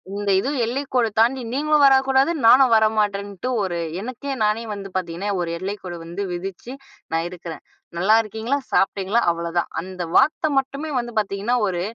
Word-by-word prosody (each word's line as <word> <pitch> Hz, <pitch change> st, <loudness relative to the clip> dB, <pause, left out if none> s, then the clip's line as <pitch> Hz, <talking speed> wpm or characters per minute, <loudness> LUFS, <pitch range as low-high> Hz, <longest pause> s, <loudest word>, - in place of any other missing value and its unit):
இந்த 205 Hz, 0 st, -1 dB
இது 255 Hz, -, -2 dB, 0.2 s
எல்லைக்கோடு 250 Hz, -1 st, 0 dB
தாண்டி 250 Hz, +4 st, +3 dB
நீங்களும் 300 Hz, +2 st, +2 dB
வரக்கூடாது. 270 Hz, +2 st, +4 dB
நானும் 250 Hz, +1 st, +7 dB
வர 220 Hz, 0 st, +5 dB
மாட்டேன்ட்டு. 200 Hz, 0 st, -1 dB, 0.2 s
ஒரு 180 Hz, -3 st, -2 dB, 0.2 s
எனக்கே 255 Hz, +4 st, -5 dB
நானே 215 Hz, +2 st, +1 dB
வந்து 200 Hz, -1 st, -7 dB
பாத்தீங்கன்னா 180 Hz, +2 st, -4 dB
ஒரு 170 Hz, -, -2 dB
எல்லைக்கோடு 185 Hz, -2 st, -5 dB
வந்து 170 Hz, +4 st, -6 dB
விதிச்சு 190 Hz, +7 st, -6 dB, 0.4 s
நான் 165 Hz, +1 st, 0 dB
இருக்கறேன். 175 Hz, -2 st, -8 dB, 0.4 s
"நல்லா 195 Hz, +5 st, +4 dB
இருக்கீங்களா, 220 Hz, +5 st, -2 dB
சாப்பிட்டீங்களா?" 195 Hz, +4 st, +1 dB
அவ்ளோதான். 170 Hz, 0 st, -2 dB
அந்த 185 Hz, 0 st, -6 dB
வார்த்தை 310 Hz, +2 st, +3 dB
மட்டுமே 275 Hz, +3 st, -5 dB
வந்து 240 Hz, 0 st, -5 dB
பாத்தீங்கன்னா 205 Hz, +3 st, -1 dB
ஒரு 175 Hz, -2 st, -2 dB
210 Hz, 150 wpm, -22 LUFS, 185-255 Hz, 0.4 s, நானும்